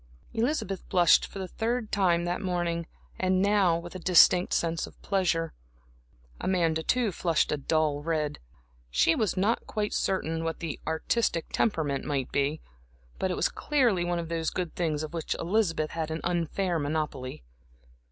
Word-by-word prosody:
Elizabeth 225 - -1
blushed 175 -3 +5
for - - -10
the 190 -1 -4
third 225 +3 -2
time 175 -4 +2
that 175 0 -2
morning, 175 -3 -1 0.3
and 185 0 +2
now 195 -4 +3
with 170 +1 -8
a 185 - -6
distinct 180 0 +5
sense 165 -1 0
of - - -16
pleasure. 175 -5 0 0.9
Amanda, 165 -4 +1
too, 240 +4 +1
flushed 165 -2 +1
a 150 - +1
dull 150 0 0
red. 155 -2 -1 0.5
She 60 - +3
was 215 -1 0
not 210 +5 +1
quite 210 -1 -2
certain 165 -4 -1
what 165 0 -3
the 160 -4 -4
artistic 165 +2 0
temperament 155 -10 0
might 140 -3 -2
be, 140 +3 0 0.6
but 190 - 0
it 180 - -2
was - - +3
clearly 245 -12 +1
one 175 0 -1
of 165 -1 -4
those 165 -1 -1
good 180 -3 -4
things 155 -3 -1
of 155 - -6
which 165 -2 -2
Elizabeth 170 -4 0
had 160 -1 -3
an 160 +1 -3
unfair 175 +1 0
monopoly. 145 - -3
170 Hz, 160 wpm, -28 LUFS, 160-190 Hz, 0.9 s, blushed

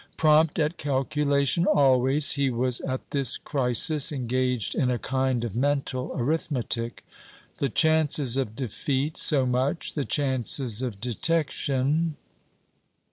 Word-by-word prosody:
Prompt 155 0 +3
at 155 +1 -1
calculation 140 +3 0
always, 140 -5 +3
he 140 -1 +1
was 125 0 0
at 130 -1 -5
this 135 -3 +1
crisis 140 +3 +2
engaged 125 -4 -1
in 125 - 0
a 125 - 0
kind 130 -1 -1
of 110 - -6
mental 135 -1 -1
arithmetic. 120 -4 -3 0.5
"The 140 - -1
chances 150 -3 +2
of 130 -5 -2
defeat, 135 +4 -3
so 135 -3 +4
much; 130 +6 -1
the 145 - -2
chances 130 -4 -1
of 120 -6 -5
detection 145 +3 -1
135 Hz, 120 wpm, -25 LUFS, 125-150 Hz, 0.5 s, so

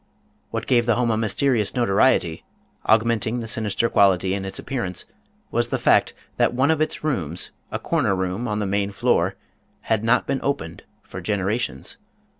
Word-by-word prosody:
What 115 -1 -4
gave 120 -2 +2
the 120 - +3
house 120 -1 +1
a - - +1
mysterious 110 +1 +1
notoriety, 100 -7 +2 0.4
augmenting 115 +1 +2
the 115 - -5
sinister 110 0 +1
quality 95 -3 +3
in 100 -1 -3
its 95 - -2
appearance, 95 -10 -3 0.5
was - - +1
the - - 0
fact - - +3 0.2
that - - +2
one 130 +5 +3
of 160 -1 0
its 155 - -1
rooms, 90 - -2 0.2
a - - -1
corner 95 - 0
room 95 +5 -2
on 105 -2 -1
the 105 - -1
main 100 0 0
floor, 100 - +1 0.5
had 110 -1 0
not 115 +2 +3
been 135 - -1
opened 85 -12 -3 0.2
for - - -8
generations. 100 - -2
110 Hz, 170 wpm, -23 LUFS, 95-120 Hz, 0.5 s, the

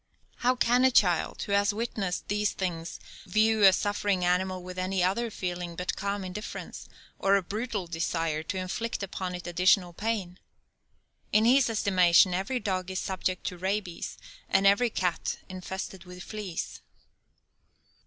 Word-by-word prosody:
How 250 +1 +2
can 245 0 +3
a 260 - +7
child 180 -9 +2
who - - -6
has 200 0 +3
witnessed 210 -5 -3
these 210 0 0
things 170 -3 -4 0.3
view 215 +3 +3
a 195 -1 +9
suffering 205 -1 0
animal 185 +1 0
with 180 0 -7
any 185 0 0
other 220 +6 +1
feeling 175 -4 -4
but 180 +2 -2
calm 200 0 -2
indifference, 190 +3 -7 0.3
or 195 0 +4
a 200 - +2
brutal 215 0 -3
desire 165 -1 -1
to 175 +4 -4
inflict 200 +4 -3
upon 185 -1 -4
it 180 - -8
additional 180 +1 +3
pain? 195 -3 -3 0.9
In 215 +1 +4
his 255 +1 +5
estimation 185 -4 +4
every 195 +8 -1
dog 185 -4 -2
is 190 - -3
subject 185 -1 -2
to 180 - -4
rabies, 190 -2 -3 0.3
and 195 +1 +3
every 200 +5 +5
cat 180 -5 -1
infested 190 0 -6
with 180 0 -10
fleas. 180 - -5
190 Hz, 150 wpm, -28 LUFS, 180-210 Hz, 0.9 s, a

